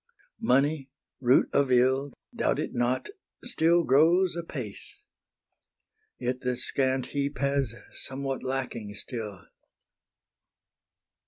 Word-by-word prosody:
Money, 140 Hz, -, +2 dB, 0.3 s
root 125 Hz, 0 st, +4 dB
of 140 Hz, -2 st, +3 dB
ill, 130 Hz, +3 st, +3 dB, 0.2 s
Doubt -, -, +1 dB
it -, -, -3 dB
not, 120 Hz, -, 0 dB, 0.3 s
still 170 Hz, -8 st, +3 dB
grows 170 Hz, +7 st, +4 dB
apace: 135 Hz, -11 st, -7 dB, 1.1 s
Yet 125 Hz, +1 st, -2 dB
the 125 Hz, -1 st, -1 dB
scant 130 Hz, +1 st, +1 dB
heap 140 Hz, 0 st, -1 dB
has 140 Hz, -4 st, 0 dB, 0.2 s
somewhat 135 Hz, 0 st, -4 dB
lacking 125 Hz, -6 st, -4 dB
still. 105 Hz, -4 st, -6 dB
135 Hz, 95 wpm, -28 LUFS, 125-140 Hz, 1.1 s, root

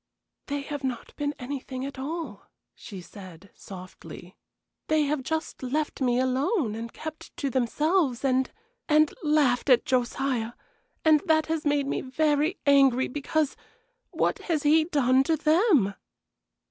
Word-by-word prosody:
"They 285 Hz, 0 st, -2 dB
have 290 Hz, 0 st, -6 dB
not 255 Hz, -3 st, -4 dB
been 290 Hz, 0 st, -2 dB
anything 260 Hz, 0 st, -5 dB
at 275 Hz, -1 st, -7 dB
all," 280 Hz, -6 st, -5 dB, 0.3 s
she 195 Hz, -3 st, -10 dB
said, 185 Hz, -1 st, -13 dB
softly; 185 Hz, -1 st, -11 dB, 0.5 s
"they 310 Hz, -1 st, +3 dB
have 295 Hz, -1 st, -1 dB
just 315 Hz, +4 st, -4 dB
left 290 Hz, +3 st, -2 dB
me 245 Hz, -1 st, +2 dB
alone 260 Hz, -, 0 dB
and 230 Hz, +1 st, -6 dB
kept 315 Hz, 0 st, -9 dB
to 280 Hz, -2 st, -2 dB
themselves, 275 Hz, +2 st, +1 dB
and 260 Hz, 0 st, +2 dB, 0.4 s
and 305 Hz, 0 st, +4 dB
laughed 295 Hz, -5 st, +2 dB
at 250 Hz, -, +5 dB
Josiah, 250 Hz, -2 st, -1 dB, 0.5 s
and 310 Hz, -1 st, +6 dB
that 315 Hz, -1 st, +3 dB
has 320 Hz, -1 st, -2 dB
made 290 Hz, -1 st, +2 dB
me 275 Hz, -, -2 dB
very 300 Hz, +5 st, +1 dB
angry, 275 Hz, -3 st, +4 dB
because 295 Hz, +2 st, -1 dB, 0.5 s
what -, -, 0 dB
has 315 Hz, -4 st, +1 dB
he 310 Hz, +2 st, +4 dB
done 265 Hz, -5 st, +3 dB
to 320 Hz, +1 st, +1 dB
them?" 310 Hz, -, +3 dB
280 Hz, 140 wpm, -26 LUFS, 250-310 Hz, 0.5 s, and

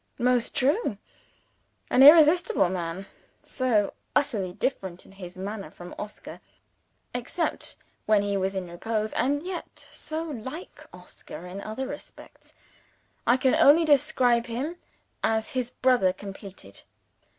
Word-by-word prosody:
Most 250 Hz, -1 st, +1 dB
true. 290 Hz, -, +1 dB, 0.9 s
An 255 Hz, -, +5 dB
irresistible 310 Hz, -, +7 dB
man. 180 Hz, +1 st, -4 dB, 0.4 s
So 235 Hz, -6 st, 0 dB, 0.2 s
utterly 215 Hz, -11 st, +1 dB
different 190 Hz, -3 st, -3 dB
in -, -, -17 dB
his 185 Hz, -2 st, -10 dB
manner 195 Hz, -1 st, -5 dB
from 175 Hz, +2 st, -11 dB
Oscar 210 Hz, 0 st, -8 dB, 0.7 s
except 250 Hz, +8 st, -3 dB, 0.3 s
when 210 Hz, -2 st, +4 dB
he 200 Hz, 0 st, -1 dB
was 195 Hz, 0 st, -1 dB
in 185 Hz, -2 st, -3 dB
repose 215 Hz, +5 st, -3 dB
and 285 Hz, +3 st, 0 dB
yet 360 Hz, -1 st, -6 dB
so 315 Hz, +1 st, -6 dB
like 295 Hz, +2 st, -8 dB
Oscar 175 Hz, -, -11 dB
in 185 Hz, +2 st, -7 dB
other 220 Hz, +6 st, -4 dB
respects, -, -, -11 dB, 0.7 s
I 245 Hz, -, +5 dB
can 260 Hz, 0 st, +2 dB
only 320 Hz, +4 st, +6 dB
describe 260 Hz, -5 st, +3 dB
him 270 Hz, +9 st, -4 dB, 0.5 s
as 220 Hz, 0 st, +1 dB
his 250 Hz, -2 st, -2 dB
brother 245 Hz, -10 st, +2 dB
completed. 195 Hz, -, -10 dB
230 Hz, 125 wpm, -26 LUFS, 195-275 Hz, 0.9 s, irresistible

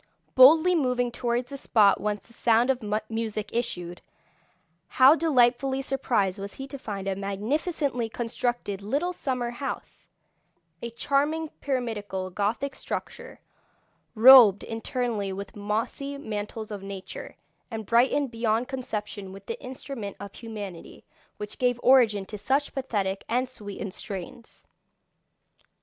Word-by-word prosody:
Boldly 315 Hz, +7 st, +7 dB
moving 250 Hz, -6 st, +1 dB
towards 240 Hz, +2 st, -2 dB
the 275 Hz, -, -5 dB
spot 210 Hz, -7 st, +3 dB
whence 210 Hz, 0 st, -2 dB
the 230 Hz, -, -15 dB
sound 235 Hz, +2 st, +3 dB
of 255 Hz, -3 st, -4 dB, 0.2 s
music 220 Hz, -2 st, -3 dB
issued, 175 Hz, -7 st, -3 dB, 0.9 s
how 265 Hz, +3 st, +7 dB
delightfully 265 Hz, -4 st, +2 dB
surprised 225 Hz, -8 st, 0 dB
was 200 Hz, 0 st, -7 dB
he 270 Hz, -, -6 dB
to 275 Hz, -, -7 dB
find 200 Hz, -5 st, -5 dB
a 195 Hz, -, 0 dB
magnificently 240 Hz, -, -2 dB
constructed 235 Hz, -3 st, -3 dB
little 285 Hz, -, -1 dB
summer 250 Hz, -7 st, -2 dB
house, 270 Hz, +3 st, -7 dB, 0.7 s
a 235 Hz, -, -4 dB
charming 290 Hz, +6 st, 0 dB
pyramidal 210 Hz, -10 st, -3 dB
Gothic 215 Hz, +8 st, -1 dB
structure, 480 Hz, -, -6 dB, 0.7 s
robed 225 Hz, -4 st, +9 dB
internally 225 Hz, -3 st, -2 dB
with 200 Hz, +3 st, -7 dB
mossy 225 Hz, +7 st, -3 dB
mantles 215 Hz, -3 st, -5 dB
of 205 Hz, -2 st, -5 dB
nature, 195 Hz, -1 st, -8 dB, 0.3 s
and 220 Hz, -2 st, -5 dB
brightened 255 Hz, +4 st, +2 dB
beyond 230 Hz, +1 st, 0 dB
conception 210 Hz, -7 st, -5 dB
with 195 Hz, +1 st, -11 dB
the 460 Hz, -, -6 dB
instrument 255 Hz, -5 st, -7 dB
of 200 Hz, 0 st, -8 dB
humanity 205 Hz, -7 st, -8 dB, 0.3 s
which 210 Hz, 0 st, -7 dB
gave 245 Hz, -1 st, +1 dB
origin 230 Hz, -6 st, +5 dB
to 210 Hz, +1 st, -8 dB
such 275 Hz, +6 st, 0 dB
pathetic 200 Hz, -8 st, -2 dB
and 250 Hz, +2 st, +1 dB
sweetened 205 Hz, -5 st, -7 dB
strains. 225 Hz, +5 st, -8 dB
235 Hz, 125 wpm, -26 LUFS, 205-265 Hz, 0.9 s, robed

